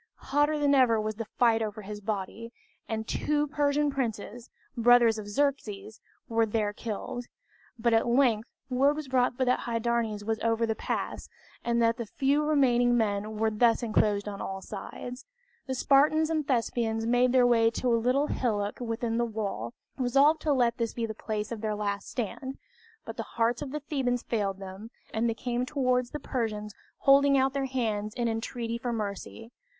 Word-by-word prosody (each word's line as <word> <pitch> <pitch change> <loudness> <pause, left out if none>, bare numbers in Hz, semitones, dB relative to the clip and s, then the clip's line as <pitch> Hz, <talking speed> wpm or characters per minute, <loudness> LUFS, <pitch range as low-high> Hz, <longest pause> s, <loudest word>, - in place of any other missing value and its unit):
Hotter 290 +2 +3
than 290 -1 +3
ever 250 -5 +4
was 215 0 -3
the 225 -2 -5
fight 230 -2 +4
over 215 -1 -4
his 205 +1 -7
body, 215 +2 -4 0.4
and 220 0 -3
two 295 0 0
Persian 290 0 +1
princes, 240 -2 -4 0.3
brothers 235 -2 +5
of 205 - -7
Xerxes, 220 -4 -2 0.3
were 225 -1 +2
there 210 -1 0
killed; 235 +3 -5 0.5
but 235 0 +1
at 225 +1 +3
length 235 -3 +2 0.2
word 275 +3 +3
was 305 -2 -5
brought 250 -1 +1
that 255 -1 +2
Hydarnes 230 -2 -1
was 225 0 -1
over 230 0 +1
the 225 - 0
pass, - - -4 0.3
and 235 0 +1
that 230 0 +2
the 235 - -5
few 280 +6 +1
remaining 245 -5 +3
men 210 -1 -1
were 220 0 +1
thus 230 +2 +3
enclosed 210 -2 +1
on 200 -1 -5
all 190 0 -4
sides. 245 +6 -8 0.4
The 260 - -2
Spartans 305 +5 +3
and 310 -3 -1
Thespians 230 -3 0
made 245 +1 +3
their 255 -1 +5
way 230 -2 +4
to 240 +1 0
a - - +5
little 260 +4 +3
hillock 210 -7 -1
within 230 -1 -2
the - - +2
wall, 205 - -4 0.2
resolved 275 +5 +4
to 305 - 0
let 245 -3 +2
this 230 -1 -2
be 235 - -1
the 220 - -4
place 215 0 -4
of 225 -2 -5
their 215 -1 -1
last 200 -1 -3
stand; 260 +3 -4 0.5
but - - -7
the - - -1 0.2
hearts 230 +1 +2
of 285 - -4
the 300 +2 -4
Thebans 260 -4 -1
failed 200 -4 -1
them, 195 +3 -9 0.2
and 230 +2 +1
they 225 - -1
came 245 +1 -2
towards 255 -2 0
the 300 - -5
Persians 215 -6 -3 0.3
holding 275 0 +5
out 265 0 +2
their 275 -1 -1
hands 220 -5 -2
in 240 -1 0
entreaty 230 +1 -3
for 240 0 -2
mercy. 220 +1 -5
235 Hz, 180 wpm, -28 LUFS, 220-260 Hz, 0.5 s, brothers